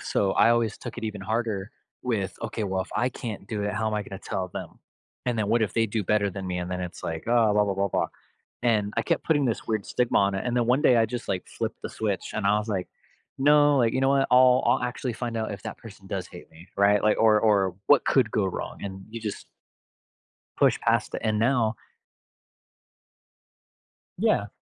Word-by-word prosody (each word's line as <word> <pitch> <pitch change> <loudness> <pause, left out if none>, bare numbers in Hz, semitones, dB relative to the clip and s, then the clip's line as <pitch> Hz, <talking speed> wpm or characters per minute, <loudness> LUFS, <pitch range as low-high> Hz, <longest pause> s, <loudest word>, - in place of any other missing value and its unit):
so, 95 -1 0
I 115 - +5
always 115 -3 +1
took - - -8
it - - -5
even 105 -2 -4
harder 110 -1 -2 0.3
with 105 -7 -2
"Okay, 110 -1 -3
well, 95 -1 -1
if - - -14
I 120 +3 +2
can't 110 -5 -7
do 105 -1 -3
it, 105 - -1
how 110 - -1
am 110 - -1
I 105 - -1
gonna 95 -1 -8
tell 95 -2 -4
them? - - -8 0.5
And 120 -2 0
then 105 -1 0
what 115 - +3
if 105 - -1
they 115 -1 +3
do 110 0 -2
better 100 0 +1
than 95 0 -6
me?" 90 -1 -2
And 90 0 -4
then 90 - -3
it's 90 -1 -7
like, 80 -1 -4
"Oh, 115 -3 +4
blah, 105 0 +4
blah, 100 -1 -1
blah, 100 +1 0
blah." - - 0 0.6
And 105 -4 +1
I 115 - +2
kept - - 0
putting 145 -3 +2
this 115 - -2
weird 110 -3 -1
stigma 125 -1 0
on 100 0 +2
it, 95 - -3
and 120 0 -1
then 120 - +3
one 125 +4 +3
day, 115 -3 +5
just, 120 +1 -6
like, 90 - -2
flipped - - -5
the - - -4
switch, 105 -4 -3
and 105 -2 -1
I 105 +1 +4
was 105 +1 -5
like, 95 -3 -2 0.5
"No, 145 +1 +5
like, 115 -3 +3
you 130 - 0
know 135 - +3
what, 135 -1 +3
I'll 125 0 +6
I'll - - +3
actually 125 0 -3
find 115 0 -4
out 110 -2 -2
if 100 - -8
that 110 - -5
person 105 -3 -13
does 95 -2 -4
hate 90 - -12
me." 80 +3 -16
Right? 100 0 +4
Like, 105 0 +3
or 110 -1 +5
or 100 -4 +2
"What 145 - +5
could 125 -5 +3
go 100 -3 +1
wrong?" 95 - -5
and 95 -1 -6
you 115 0 -6
just 105 -2 -5 1.1
push - - +3
past - - +1
it - - -2
and 110 -1 +1
now 115 -2 +2 2.4
Yeah. - - +2
110 Hz, 230 wpm, -26 LUFS, 100-120 Hz, 2.4 s, I'll